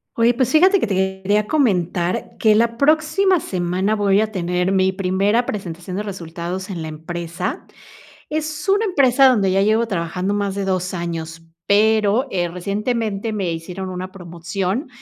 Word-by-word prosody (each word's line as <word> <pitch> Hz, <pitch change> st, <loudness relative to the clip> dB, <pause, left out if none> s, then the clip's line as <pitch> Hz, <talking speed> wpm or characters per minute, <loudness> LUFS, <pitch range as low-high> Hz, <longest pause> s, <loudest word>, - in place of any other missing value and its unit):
Oye, 235 Hz, +1 st, +3 dB
pues, 255 Hz, 0 st, +1 dB
fíjate 370 Hz, +5 st, +5 dB
que -, -, +1 dB
te 190 Hz, -2 st, -1 dB
quería 205 Hz, +2 st, +1 dB
comentar 180 Hz, -, 0 dB
que 215 Hz, -1 st, +4 dB
la 230 Hz, +2 st, +2 dB
próxima 315 Hz, +7 st, +3 dB
semana 185 Hz, -, -1 dB
voy 205 Hz, -1 st, +3 dB
a 215 Hz, 0 st, -1 dB
tener 180 Hz, -1 st, -1 dB
mi 190 Hz, -1 st, +3 dB
primera 195 Hz, +4 st, +1 dB
presentación 180 Hz, -2 st, -5 dB
de 205 Hz, -, -2 dB
resultados 180 Hz, -1 st, -6 dB
en 175 Hz, -4 st, -5 dB
la -, -, -5 dB
empresa. 170 Hz, +2 st, -5 dB, 0.6 s
Es 310 Hz, +3 st, -3 dB
una 410 Hz, +3 st, +3 dB
empresa 270 Hz, -, +4 dB
donde 210 Hz, -7 st, +3 dB
ya 195 Hz, +1 st, +2 dB
llevo 220 Hz, +3 st, +2 dB
trabajando 185 Hz, +1 st, -2 dB
más 200 Hz, -1 st, -1 dB
de 200 Hz, -1 st, -3 dB
2 185 Hz, -1 st, -1 dB
años, 165 Hz, -2 st, -5 dB, 0.2 s
pero, 215 Hz, +3 st, +3 dB
eh, 175 Hz, -2 st, 0 dB
recientemente 210 Hz, +4 st, -2 dB
me 195 Hz, -5 st, -2 dB
hicieron 180 Hz, +3 st, -6 dB
una 185 Hz, 0 st, -6 dB
promoción, 180 Hz, -, -4 dB
195 Hz, 160 wpm, -20 LUFS, 180-230 Hz, 0.6 s, fíjate